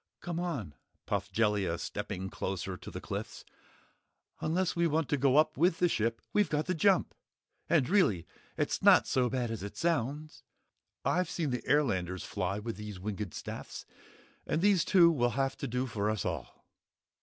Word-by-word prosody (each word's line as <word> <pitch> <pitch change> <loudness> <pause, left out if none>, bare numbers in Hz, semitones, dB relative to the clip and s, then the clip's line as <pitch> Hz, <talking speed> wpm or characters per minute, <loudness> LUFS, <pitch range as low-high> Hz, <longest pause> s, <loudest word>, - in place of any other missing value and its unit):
"Come 170 -1 -4
on," 140 - -3 0.3
puffed - - -2
Jellia 105 -6 +1
stepping 95 +3 -5
closer 95 0 -3
to - - -10
the - - -6
cliffs, - - -6 0.9
"unless 180 +3 0
we 170 0 +3
want 160 -1 0
to 145 - +2
go 135 +1 +3
up 155 -1 +3
with 165 +3 +3
the 180 - +3
ship 115 -7 -1
we've 205 -5 +3
got 150 0 0
to 185 - 0
jump! 185 +2 +3 0.6
And 125 - +3
really 130 - +3 0.3
it's - - -1
not - - +7
so 125 -2 +1
bad 125 -3 -1
as 115 - -4
it 100 +1 -7
sounds! 155 -2 -1 0.6
I've 180 -1 +1
seen 155 -6 -2
the 125 -2 -2
airlanders 95 - +1
fly 95 0 -2
with 110 0 -5
these 105 -3 -7
winged 100 -2 -4
staffs, - - -7 0.6
and 165 - 0
these 200 -4 +4
two 175 -4 +6
will 120 -6 +1
have 135 -1 +1
to - - -4
do 125 +2 -1
for 105 -4 -1
us 110 -3 -2
all." - - -5
130 Hz, 175 wpm, -31 LUFS, 105-165 Hz, 0.9 s, not